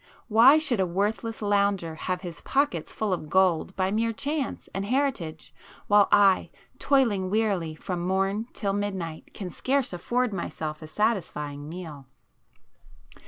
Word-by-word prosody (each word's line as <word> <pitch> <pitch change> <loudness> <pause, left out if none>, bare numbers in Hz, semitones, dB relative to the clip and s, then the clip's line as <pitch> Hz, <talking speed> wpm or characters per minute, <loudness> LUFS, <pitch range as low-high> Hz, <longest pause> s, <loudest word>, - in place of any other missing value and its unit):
Why 235 +7 +7
should 280 -8 +1
a 190 - +2
worthless 215 +5 -2
lounger 200 -5 +1
have 180 +3 -3
his 175 -3 -8
pockets 270 - 0
full 215 -3 -1
of 155 -4 -4
gold 185 0 +2
by 190 0 0
mere 225 +2 +1
chance 280 +2 -3
and 195 - -2
heritage, 235 - -2 0.3
while 205 -1 +5
I, 200 -2 +5 0.3
toiling 230 -10 +2
wearily 195 -7 0
from 180 +1 -4
morn 195 +4 0
till 200 -2 -2
midnight, 190 -6 -4
can 185 -3 -6
scarce 270 -5 0
afford 240 +6 -1
myself 155 -4 -4
a 155 - -8
satisfying 155 -8 -2
meal?" 160 -6 -8
195 Hz, 140 wpm, -26 LUFS, 175-225 Hz, 0.3 s, Why